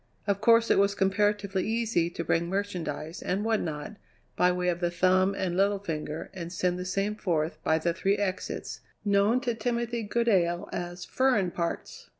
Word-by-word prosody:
Of 200 -1 0
course 230 +1 +5
it - - +5
was 200 0 +3
comparatively 200 0 +1
easy 225 -7 +1
to 170 - -5
bring 170 +1 0
merchandise, 175 -5 -3
and 195 +4 -1
what 225 -1 +2
not, 155 +6 -5 0.4
by 180 - +4
way 180 0 -1
of 175 -1 -1
the 175 -1 +1
thumb 185 +2 +3
and 180 -3 -2
little 200 +2 +3
finger 160 -4 -5
and 170 -3 -6
send 180 0 0
the 180 - -4
same 195 +3 -1
forth 165 -6 -1
by 160 - +3
the 170 +1 0
three 195 +3 +1
exits, 190 -2 -3 0.3
known 205 +5 +3
to 245 -3 0
Timothy 235 +1 -2
Goodale 205 -5 +1
as 175 0 -5
"furrin 250 -9 +2
parts." 170 -1 -4
190 Hz, 175 wpm, -28 LUFS, 175-210 Hz, 0.4 s, course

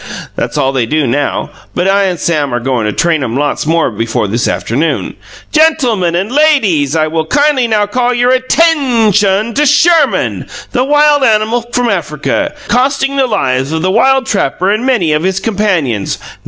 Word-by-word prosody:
(That's - - -3
all 135 - +1
they 125 -4 -1
do 155 +3 0
now, 135 +4 -2 0.2
but 180 +1 0
I 200 0 +2
and 180 -3 -2
Sam 150 -5 -1
are - - -1
goin' 120 -2 -2
to - - -1
train 160 +3 0
'em 120 0 -3
lots 145 +1 -2
more 165 -4 +1
before 115 0 -2
this 115 +4 -1
afternoon.) 145 +8 -2 0.4
GEN 320 +1 +4
til 250 -7 -1
mun 175 -3 -1
and 190 +6 -2
LAY 305 +2 +4
deeze 160 - -1
I 155 -1 +2
will 160 0 -2
kindly 290 - +2
now 215 -2 +1
call 245 +4 -1
your 245 +1 +1
at 255 0 -1
tain 275 -9 +2
shon 205 +3 +1
to 290 - +1
Sherman, 315 0 +2 0.2
the 250 - 0
wild 295 0 +3
animal 225 +1 +1
from 245 0 0
Africa, 195 - -2
costing 270 +2 0
the 270 -2 +1
lives 135 - -1
of 160 0 -2
the 185 - +1
wild 265 +5 +2
trapper 190 - -1
and 220 +5 -1
many 190 -12 +1
of 150 - 0
his 190 +2 -1
companions. 190 - -1
200 Hz, 195 wpm, -12 LUFS, 155-255 Hz, 0.4 s, GEN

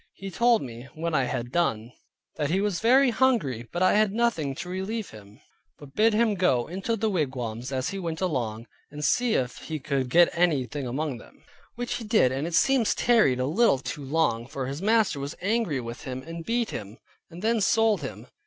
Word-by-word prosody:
He 195 0 -7
told 235 +1 +3
me, 120 0 -9
when 165 +1 -3
I 135 -4 +2
had 120 0 -4
done, 120 -9 0 0.5
that 150 -3 -1
he 185 +4 +1
was 200 -4 0
very 255 +3 +5
hungry, 220 - +1
but 175 +1 -1
I 185 - +4
had 215 -1 +3
nothing 205 -12 0
to 165 - -6
relieve 190 +4 -4
him, 105 -1 -14 0.4
but 140 -2 -13
bid 220 +4 +3
him 225 -1 +3
go 155 -11 +2
into 195 +6 -3
the 220 0 -1
wigwams 130 - -2
as 130 -1 -1
he 195 - -5
went 165 -3 -4
along, 120 - -2 0.2
and 150 0 -5
see 245 -2 +2
if 125 -1 -1
he 160 - -5
could 135 -2 -2
get 175 +6 +5
any 165 -7 +2
thing 140 0 -5
among 135 0 -3
them. - - -18 0.3
Which 245 0 -3
he 235 - -7
did, 215 - +3
and 135 +4 -2
it 170 - -2
seems 260 +2 +3
tarried 220 - +3
a 130 - +1
little 175 - +3
too 140 +2 -6
long; 135 -5 0
for 135 -1 -4
his 140 +5 -5
master 215 -6 +2
was 140 +3 -5
angry 200 - 0
with 120 0 -7
him, 130 -2 -6
and 165 0 -7
beat 235 +3 -1
him, 105 +2 -7 0.3
and 175 +3 -11
then 225 0 +2
sold 225 +1 +3
him. - - -7
165 Hz, 210 wpm, -26 LUFS, 130-215 Hz, 0.5 s, very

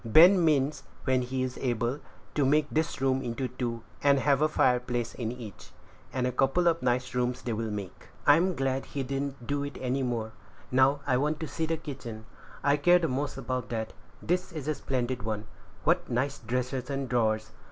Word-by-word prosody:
Ben 170 - +7
means, 150 -2 +2 0.2
when 130 -1 +2
he 130 +1 -2
is 130 -1 -4
able, 120 +1 0 0.3
to 145 - +2
make 150 +3 +4
this 160 -2 0
room 135 0 +2
into 125 +1 -2
two, 120 -2 -4 0.2
and 140 -1 +5
have 140 +1 +3
a 155 - +4
fireplace 125 -4 +1
in 115 -2 -3
each; 115 -6 -9 0.4
and 130 -1 -1
a 125 - +1
couple 135 +8 +2
of 165 -1 +3
nice 125 0 0
rooms 125 0 -1
they 120 - -2
will 110 0 -2
make." 100 -3 -6 0.2
"I 145 - +8
am 180 +1 +1
glad 135 0 0
he 140 -2 -3
didn't 135 -1 -3
do 140 +1 -1
any 135 -1 -2
more. 115 -3 -2 0.4
Now, 135 +2 +4
I 125 - +2
want 150 +3 0
to 160 - -2
see 160 +1 -2
the 165 0 0
kitchen; 130 -8 -7 0.4
I 145 +1 +4
care 175 +5 +6
the 170 -2 0
most 135 +1 -2
about 130 -1 -3
that. 110 -2 -3 0.3
This 180 +2 0
is 155 -4 -6
a 155 - +2
splendid 130 -3 -2
one; 110 -1 -3 0.4
what - - +2
nice 135 +4 0
dressers 125 +3 -2
and 135 -1 -2
drawers! 110 -3 +1
130 Hz, 195 wpm, -29 LUFS, 120-145 Hz, 0.4 s, I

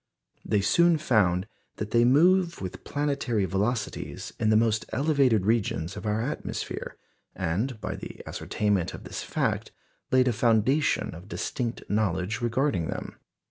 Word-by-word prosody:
They 105 -2 +1
soon 170 - +4
found 95 -9 +2 0.3
that 105 0 -5
they 120 0 +4
move 170 +6 +4
with 95 -2 -6
planetary 140 -8 0
velocities 105 +5 -2
in 110 - +2
the 110 - +5
most 110 -1 +2
elevated 135 -8 +2
regions 100 -6 0
of - - -6
our 105 +2 0
atmosphere, 140 - -4 0.4
and 105 +8 -1
by - - -4
the - - -9
ascertainment 100 -5 -1
of - - -10
this - - -6
fact - - -1 0.4
laid 130 0 +4
a 125 - +3
foundation 115 +6 +2
of 85 +4 -11
distinct 120 +1 -3
knowledge 100 0 0
regarding 120 - 0
them. - - -6
110 Hz, 140 wpm, -27 LUFS, 100-130 Hz, 0.4 s, the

